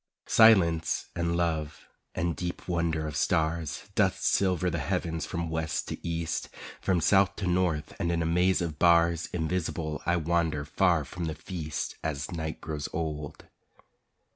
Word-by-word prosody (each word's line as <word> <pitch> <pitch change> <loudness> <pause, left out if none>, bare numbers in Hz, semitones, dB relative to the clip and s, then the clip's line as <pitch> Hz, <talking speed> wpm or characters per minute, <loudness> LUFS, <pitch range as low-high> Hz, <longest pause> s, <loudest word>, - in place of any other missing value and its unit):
Silence 85 -8 +4
and 85 0 0
love 80 -4 -2 0.3
and 85 -2 -1
deep 90 -1 -5
wonder 85 -3 0
of 75 -1 -4
stars 80 0 0
Dust - - +1
silver 95 -2 +2
the 85 - -2
heavens 80 +3 -2
from 85 -2 -3
west 80 -1 -2
to - - -6
east, 85 0 -2 0.3
From 90 -2 +2
south 95 +3 +4
to 100 - -4
north, 90 -4 0
and 85 - 0
in 85 -1 0
a - - -1
maze 90 +2 +2
of 80 -2 -5
bars 85 -1 +4
Invisible 80 -2 -2
I 85 0 +3
wander 80 -3 0
far 85 -2 +2
from 90 +2 -5
the 80 -1 -3
feast 80 0 -5
As 70 -3 -3
night 80 -2 -4
grows 75 -2 -4
old. 75 -2 -4
85 Hz, 155 wpm, -28 LUFS, 80-85 Hz, 0.3 s, Silence